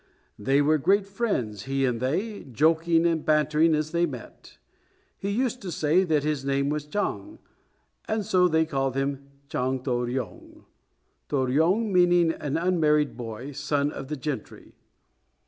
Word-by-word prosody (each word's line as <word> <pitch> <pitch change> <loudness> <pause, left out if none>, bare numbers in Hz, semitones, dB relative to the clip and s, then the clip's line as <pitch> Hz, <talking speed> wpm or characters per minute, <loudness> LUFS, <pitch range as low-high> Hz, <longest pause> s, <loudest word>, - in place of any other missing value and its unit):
They 135 +7 +2
were 155 +1 +3
great 195 +7 +3
friends, 130 - -2
he 135 0 0
and 120 -3 -1
they, 190 - -2
joking 165 +5 +2
and 165 -2 +1
bantering 155 +1 +3
as 155 0 -2
they 170 +1 +2
met. - - -11 0.6
He 200 - -3
used 250 +3 -1
to 190 -3 -5
say 160 +4 +2
that 155 -4 +1
his 150 -2 -1
name 140 0 0
was 150 0 -3
Chang, 210 - -3 0.7
and 220 -2 -1
so 180 -1 +4
they 160 -1 +2
called 135 -4 -1
him 140 0 -2 0.2
Chang 130 -1 -2
To 130 - -2
ryong, 120 0 -4 0.7
To - - -1
ryong 160 - +2
meaning 175 -2 +4
an 145 -2 -3
unmarried 155 -4 +2
boy, 120 +3 -7
son 145 +1 -1
of 135 - -7
the 150 +1 -4
gentry. 140 0 -6
150 Hz, 155 wpm, -26 LUFS, 135-175 Hz, 0.7 s, so